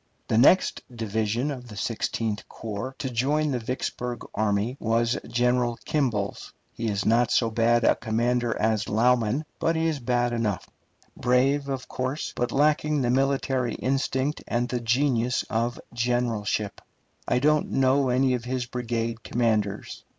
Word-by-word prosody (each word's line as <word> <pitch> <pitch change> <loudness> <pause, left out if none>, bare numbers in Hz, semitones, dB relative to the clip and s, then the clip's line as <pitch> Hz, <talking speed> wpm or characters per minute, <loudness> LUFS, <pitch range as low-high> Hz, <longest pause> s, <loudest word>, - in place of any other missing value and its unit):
The 110 - +2
next 180 +9 +5
division 110 +3 -1
of 125 -3 -7
the 105 -3 -10
Sixteenth 110 0 -2
Corps 115 +4 -6
to - - -3
join 145 +5 +1
the 125 - 0
Vicksburg 125 0 -4
army 105 +3 0
was 115 +2 +1
General 120 0 +1
Kimball's. 125 -10 -1 0.2
He 115 - -3
is 100 -2 -1
not 115 +1 +3
so 115 -2 +2
bad 115 +1 +3
a - - +5
commander 120 +1 0
as 110 -1 +1
Lauman, 120 +4 +2
but 165 - +1
he 160 0 +1
is 160 -3 0
bad 120 -1 0
enough; 110 -5 -1 0.5
brave, 135 +3 +2
of 135 -2 -3
course, 130 +4 -3
but 120 - -1
lacking 150 0 +2
the 120 - +2
military 135 -2 +1
instinct 135 +2 -1
and 120 +1 0
the 125 - -1
genius 125 0 +1
of 115 +2 -1
generalship. 120 -4 -1 0.5
I - - +2
don't 150 +3 +2
know 135 0 +3
any 130 +1 +3
of 120 -1 -2
his 125 0 -2
brigade 115 -1 -3
commanders. 110 -5 -1
120 Hz, 150 wpm, -26 LUFS, 115-130 Hz, 0.5 s, next